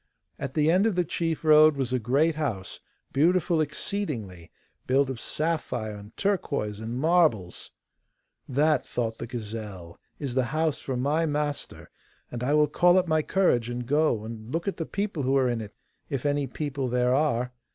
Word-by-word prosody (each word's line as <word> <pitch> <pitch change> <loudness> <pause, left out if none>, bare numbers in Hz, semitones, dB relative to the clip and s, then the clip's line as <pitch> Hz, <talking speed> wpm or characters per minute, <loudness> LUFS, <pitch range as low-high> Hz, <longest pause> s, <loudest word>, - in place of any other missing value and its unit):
At 135 -1 -5
the 155 0 +3
end 190 +5 +4
of 215 - 0
the 180 -1 +1
chief 165 0 -2
road 155 0 +7
was 130 -2 -2
a 130 - +2
great 140 +8 +2
house, 120 -12 -3 0.3
beautiful 170 +2 +3
exceedingly, 140 - -4 0.4
built 135 +1 +2
of 120 - -7
sapphire 150 -9 -2
and 105 +2 -12
turquoise 140 - -1
and 115 +2 -4
marbles. 150 - +2 0.8
'That,' 150 +4 +2
thought 115 -2 -3
the 115 - -5
gazelle, 105 -7 -7 0.2
'is 140 -4 -4
the 130 -1 +1
house 160 -2 +1
for 130 -2 -4
my 150 +6 +1
master, 145 -1 -3 0.4
and 120 0 -4
I 145 +4 +2
will 150 0 +5
call 175 +4 +4
up 185 -1 +2
my 155 -1 +2
courage 150 -10 +1
and 120 0 -4
go 145 -5 +2
and 110 +1 -8
look 165 +5 -2
at 200 - -2
the 165 - -4
people 200 -6 -2
who 135 +1 +2
are 130 -1 +3
in 120 -2 -1
it, 105 -1 -9 0.3
if 140 -2 -3
any 145 -1 +1
people 140 -3 -3
there 125 +1 +2
are. 125 -4 +1
140 Hz, 180 wpm, -27 LUFS, 120-155 Hz, 0.8 s, road